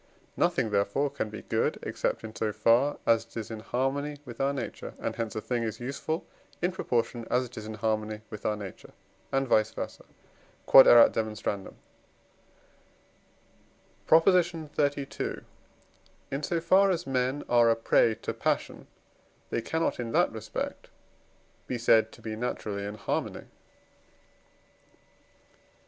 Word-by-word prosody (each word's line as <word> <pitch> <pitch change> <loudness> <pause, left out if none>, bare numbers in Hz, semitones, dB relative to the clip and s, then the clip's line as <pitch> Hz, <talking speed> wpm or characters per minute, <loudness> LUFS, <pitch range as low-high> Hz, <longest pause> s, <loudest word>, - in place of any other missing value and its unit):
Nothing, 110 - +1
therefore, 100 +8 +1
can 125 -6 -3
be 110 -1 -8
good, - - 0
except - - -2
in 110 -1 -8
so 105 +1 -1
far 120 +7 +3
as 115 -1 +4
it 115 - -13
is 115 0 -5
in 110 - -5
harmony 135 +6 -2
with 120 -1 -7
our 135 +1 +2
nature; 135 -4 -6
and - - -3
hence 115 -2 -4
a 110 - -2
thing 120 0 -2
is 110 -1 -3
useful, 140 +6 -3 0.3
in 175 +1 +1
proportion 120 -8 -2
as 125 +1 +2
it 125 0 -13
is 110 -2 -7
in 110 - -6
harmony 110 -1 -2
with 105 -1 -8
our 105 - 0
nature, 100 -3 -9 0.4
and 135 0 +1
vice 110 -2 +3
versâ. - - -5 0.7
Q.E.D. 110 -5 +6 2.4
PROP. 165 +1 +6
XXXII. 155 -6 0 0.9
In 135 - -2
so 170 +3 -1
far 190 +4 +4
as 175 -2 -1
men 130 +1 -1
are 120 -1 +5
a 115 - +4
prey 115 0 +3
to - - -2
passion, - - -2 0.6
they - - 0
cannot, 160 +4 -1
in 115 -2 -3
that - - +3
respect, - - -5 0.8
be 125 - -2
said 110 -1 +4
to - - -16
be 110 -1 -4
naturally 105 -3 -3
in 100 +1 -5
harmony. 105 - -3
120 Hz, 140 wpm, -28 LUFS, 110-140 Hz, 2.4 s, Q.E.D